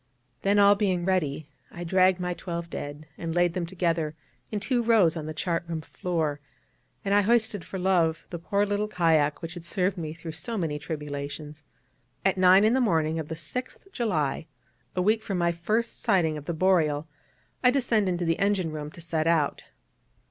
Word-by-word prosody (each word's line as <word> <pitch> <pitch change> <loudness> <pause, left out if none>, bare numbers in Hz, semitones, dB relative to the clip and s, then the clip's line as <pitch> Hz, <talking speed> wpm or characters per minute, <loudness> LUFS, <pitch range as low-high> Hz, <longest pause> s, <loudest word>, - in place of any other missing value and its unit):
Then, 200 +1 +2
all 200 0 +7
being 190 -4 0
ready, 155 -6 0 0.2
I 175 - -7
dragged 185 +1 +3
my 180 0 -1
twelve 170 0 -5
dead 145 +2 -6
and 165 -1 -3
laid 175 -1 +3
them 175 -2 -2
together 165 -4 -1 0.3
in 210 - -2
two 245 +3 0
rows 220 -8 +4
on 155 -2 -5
the 155 - -4
chart 170 -1 -1
room 165 -2 -3
floor; 160 -3 -2 0.7
and 200 - +1
I 205 - +6
hoisted 220 -3 +2
for 190 - -6
love 175 -3 +1
the 170 - -4
poor 200 +4 +1
little 205 +1 -1
kayak 165 -7 +2
which 165 +1 -5
had 175 -2 -8
served 185 +2 -1
me 155 -2 -4
through 165 0 -7
so 225 +8 -4
many 155 -5 -2
tribulations. 150 0 -6 0.6
At 195 - +3
nine 185 +1 +6
in 220 +2 +4
the 260 - +3
morning 160 -7 +1
of 155 - -4
the 160 - -4
6th 250 - -6
July, 160 - -1 0.5
a 180 - +1
week 215 +3 +3
from 195 -3 -3
my 170 -1 +2
first 215 +8 -1
sighting 180 -8 +2
of 150 -1 -7
the 170 - -2
Boreal, 160 -4 +2 0.6
I 250 - +7
descended 225 -8 +1
to 175 - -2
the 165 0 +1
engine 195 -5 +1
room 150 -1 -5
to - - -11
set 160 -1 -1
out. 160 -4 +1
175 Hz, 190 wpm, -27 LUFS, 160-200 Hz, 0.7 s, all